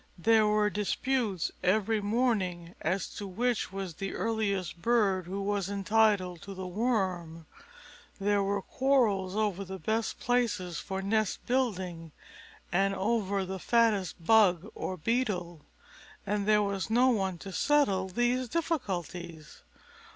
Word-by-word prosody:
There 220 +4 +4
were 210 0 +2
disputes 210 -1 -1
every 210 +3 +2
morning 200 -6 0
as 190 +1 -1
to 205 - -5
which 230 +1 -1
was 195 -3 -5
the 195 +4 -5
earliest 200 -6 -1
bird 200 -6 +2
who 195 +2 -3
was 200 -1 -1
entitled 200 -3 +2
to 200 -1 -8
the 185 0 -6
worm. 180 -6 -1 0.7
There 205 +1 +2
were 200 0 -1
quarrels 220 -9 +1
over 205 -3 0
the 190 0 -7
best 220 +6 -2
places 220 -8 0
for 190 -1 -4
nest 215 0 0
building 185 - -2 0.6
and 195 +3 +2
over 200 -2 0
the 190 +1 -5
fattest 205 -7 +1
bug 205 -3 +4
or 185 - -4
beetle; 180 - -2 0.6
and 205 0 -1
there 210 -1 +4
was 200 0 -2
no 245 +3 +4
one 190 -6 0
to 195 +3 -8
settle 205 -11 +2
these 240 +4 0
difficulties. 180 - -4
200 Hz, 130 wpm, -30 LUFS, 185-225 Hz, 0.7 s, There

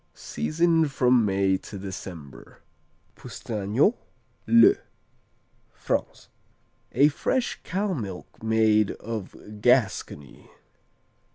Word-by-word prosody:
Season 165 0 0
from 125 -3 +3
May 95 -1 +1
to 100 - -10
December. 90 -7 -9 0.6
Poustagnax, 110 - -1 0.5
le 235 +12 +7 1.0
France - - -4 0.7
A 145 - +5
fresh 245 - -2
cow 195 +1 -2
milk 100 - -6 0.2
cheese 110 -2 +2
of 105 -1 -8
Gascony. 105 - 0
110 Hz, 80 wpm, -25 LUFS, 95-150 Hz, 1.0 s, le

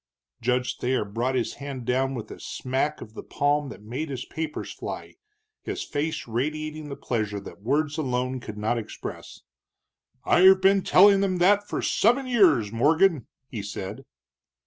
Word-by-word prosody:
Judge 125 +1 0
Thayer 125 -3 0
brought 120 +6 -2
his 125 - -1
hand 135 -3 -6
down 130 +2 0
with 115 - -7
a - - -9
smack 135 +4 -2
of 110 - -10
the - - -7
palm 145 0 0
that 105 - -11
made 130 +8 -4
his 130 -2 -5
papers 160 -2 -5
fly, - - -7 0.5
his - - -4
face 155 0 -3
radiating 155 +5 -3
the 140 - -5
pleasure 110 -6 -2
that 100 - -11
words 145 +6 0
alone 130 -2 -1
could 110 -3 -8
not 110 +3 0
express. 110 - -8 0.8
"I've 190 +1 +6
been 195 +1 +4
telling 195 +1 +6
them 190 -2 +1
that 205 +3 +3
for - - -3
seven 245 +5 +2
years, 175 - +4
Morgan!" 155 - +3 0.2
he 110 -6 -5
said. 100 +4 -6
135 Hz, 160 wpm, -25 LUFS, 120-160 Hz, 0.8 s, I've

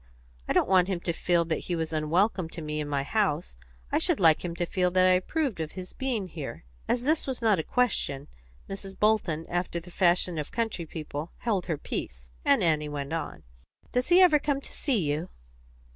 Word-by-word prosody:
I - - +1
don't - - +3
want 185 -1 +4
him 190 -3 -1
to 170 - -1
feel 170 0 +2
that 160 -1 -2
he 175 - 0
was 160 -1 -3
unwelcome 170 +4 +1
to 165 - -7
me 150 0 -3
in 150 -1 -3
my 140 -1 0
house; 175 - 0 0.4
I - - +3
should - - +2
like 160 -4 +5
him 170 -1 -4
to 175 - -1
feel 180 +1 +1
that 185 +1 +3
I 185 - +6
approved 220 - 0
of 160 -1 -4
his 185 -1 -7
having 255 -6 -2
been - - -7
here." 155 - -7 0.2
As 240 0 0
this 310 +3 +1
was 260 -2 -1
not 215 -6 +3
a - - -1
question, 150 - 0 0.4
Mrs. 195 0 -7
Bolton, 195 -7 +1
after 175 0 -2
the 180 +1 -13
fashion 175 -2 +2
of 150 - -5
country 225 -8 -2
people, 155 0 -6
held 200 -7 -1
her 160 -4 -1
peace, 60 - -6
and - - +4
Annie 150 -2 +1
went 145 0 -4
on 165 - -4 0.5
"Does 250 0 0
he 350 - +6
never 355 -5 +7
come 285 -1 0
to - - -9
see 275 -5 0
you?" 150 +3 -1
175 Hz, 215 wpm, -28 LUFS, 160-210 Hz, 0.5 s, never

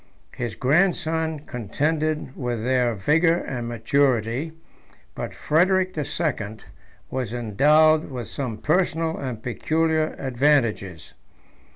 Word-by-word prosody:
His 120 -4 -5
grandson 160 +1 +1
contended 150 +4 -2
with 120 -4 -3
their 125 -2 +1
vigor 165 - +3
and 125 -8 -4
maturity; 120 +3 0 0.6
but - - -6
Frederic 185 +4 +2
the 150 - -2
Second 110 -10 -3 0.4
148 - - -33
was 125 -4 -2
endowed 150 +8 +3
with 125 -4 -5
some 125 -6 -4
personal 160 - +1
and 125 -5 -5
peculiar 160 +5 0
advantages. 120 - 0
140 Hz, 105 wpm, -24 LUFS, 120-160 Hz, 0.6 s, vigor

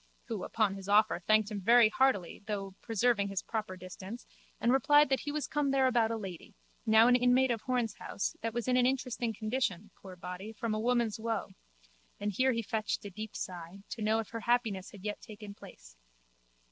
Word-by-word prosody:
Who, 220 -5 -3
upon 215 -4 +1
his 195 0 -8
offer, 210 -1 +4
thanked 215 0 +4
him 205 -2 -4
very 235 +3 +6
heartily, 215 -7 +1
though 195 -2 -3
preserving 225 -2 +1
his 195 -1 -3
proper 215 -5 -4
distance, 185 +5 -9 0.3
and 235 - +2
replied 290 +1 +5
that 270 - +2
he 290 - -4
was 300 0 -2
come 295 -2 0
there 270 -1 +3
about 235 -3 +3
a 225 - -2
lady, 190 -5 -8 0.3
now 220 +1 +7
an 245 - +6
inmate 250 +1 +4
of 230 -2 -1
Horne's 245 -3 -1
house, - - -3
that 230 - -2
was 240 +1 -3
in 250 0 +3
an 250 0 +4
interesting 250 -3 -1
condition, 215 -3 -2
poor 190 -2 -11
body, 180 +4 -7
from 225 +1 -3
woman's 230 0 +1
woe 225 -3 -2 0.7
(and 205 +1 -1
here 260 +7 +2
he 230 -2 -1
fetched 215 -1 -2
a 200 - -6
deep 215 +3 -7
sigh) 180 +1 -7
to 230 - -6
know 215 +1 +2
if 225 -2 -3
her 230 - -5
happiness 225 -5 0
had 195 -2 -13
yet 210 0 -3
taken 210 -1 -10
place. - - -14
220 Hz, 200 wpm, -31 LUFS, 200-245 Hz, 0.7 s, now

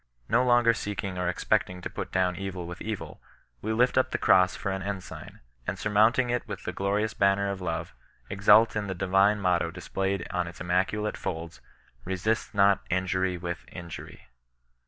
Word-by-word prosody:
No 125 +2 +3
longer 120 -2 +4
seeking 100 -3 -4
or 90 -1 0
expecting 90 +1 0
to - - -3
put - - -6
down 90 -1 +1
evil 95 -1 -5
with 90 +1 -8
evil, 110 -2 -5 0.4
we 110 - -2
lift 125 +3 +3
up 130 - +1
the - - -1
cross 90 -1 +4
for 100 - -3
an 95 0 -3
ensign, 100 -1 -7 0.3
and 95 - -2
surmounting 110 +5 +3
it 125 -1 -2
with 100 -3 -6
the - - -4
glorious 105 +2 0
banner 100 0 +2
of 95 -1 -6
love, 85 -2 -3 0.3
exult 105 +3 +5
in 105 -1 -2
the 95 - -3
divine 95 +3 +3
motto 90 -3 +1
displayed 95 +2 -3
on 90 -1 -1
its 85 - -10
immaculate 95 +4 0
folds, 80 -1 -5 0.2
'* - - -34
RESIST 95 +4 -1
NOT 100 0 +4
INJUBT 95 0 0
WITH 85 -1 -4
INJURY." 85 -2 -9
95 Hz, 175 wpm, -27 LUFS, 90-105 Hz, 0.4 s, exult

